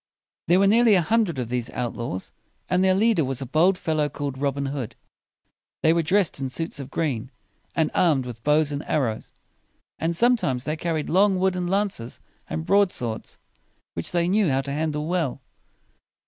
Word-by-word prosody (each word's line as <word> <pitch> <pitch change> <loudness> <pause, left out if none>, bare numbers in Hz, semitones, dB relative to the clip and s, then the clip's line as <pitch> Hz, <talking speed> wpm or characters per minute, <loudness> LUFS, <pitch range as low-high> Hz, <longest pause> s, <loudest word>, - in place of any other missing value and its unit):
There 175 +3 +5
were 200 - +4
nearly 225 +1 +5
a 180 - +4
hundred 215 -5 +1
of 125 -3 -3
these 120 -1 -2
outlaws, 120 -6 -4 0.4
and 180 +1 +2
their 190 0 +4
leader 215 -4 +3
was 135 -1 -3
a 135 - -4
bold 165 +8 +3
fellow 155 -4 0
called 145 -2 -4
Robin 140 0 -1
Hood. 135 -4 -4 0.9
They 160 - +5
were 170 - +2
dressed 180 -1 +1
in 135 -1 -2
suits 160 +4 -4
of 135 -2 -7
green, 135 -7 -2 0.5
and 160 -2 +1
armed 150 -8 +2
with 115 -2 -8
bows 150 0 +3
and 145 +1 -3
arrows; 120 -8 -1 0.7
and 165 +1 -1
sometimes 190 - +2
they 155 - -1
carried 160 -2 -2
long 195 +2 +3
wooden 180 -1 0
lances 190 - -2 0.3
and 80 0 -3
broad 200 -2 +4
swords, 115 -3 -5 0.6
which 85 - -4
they 175 -1 +1
knew 200 -1 +2
how 135 0 +1
to 140 0 -5
handle 150 0 -1
well. 165 -7 -1
155 Hz, 175 wpm, -24 LUFS, 135-185 Hz, 0.9 s, There